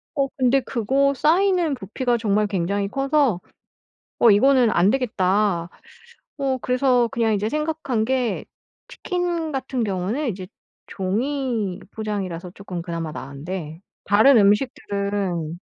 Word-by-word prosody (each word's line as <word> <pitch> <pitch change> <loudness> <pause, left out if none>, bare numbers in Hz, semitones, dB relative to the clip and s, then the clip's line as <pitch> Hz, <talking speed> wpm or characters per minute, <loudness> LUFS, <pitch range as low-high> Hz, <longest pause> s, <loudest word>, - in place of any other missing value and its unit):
어 275 -2 +1
근데 260 +1 +3
그거 270 +4 +1
쌓이는 340 +2 +2
부피가 240 +3 -1
정말 210 -2 +1
굉장히 200 +1 -1
커서 275 - +1 0.8
'어 235 - +6
이거는 250 +3 +5
안 185 0 +3
되겠다.' 200 -7 +1 0.7
어 270 -2 0
그래서 250 -1 +2
그냥 230 -3 +1
이제 205 +1 -1
생각한 300 -7 -1
게 255 -2 -1 0.4
치킨 350 -3 -3
같은 260 -2 -2
경우는 205 +8 -2
이제 190 -4 -5 0.4
종이 225 0 -2
포장이라서 190 -5 -4
쪼끔 185 -3 -6
그나마 165 -2 -4
나은데 155 +4 -7 0.2
다른 225 +6 +6
음식들은 200 -6 0
220 Hz, 260 characters per minute, -22 LUFS, 195-270 Hz, 0.8 s, 어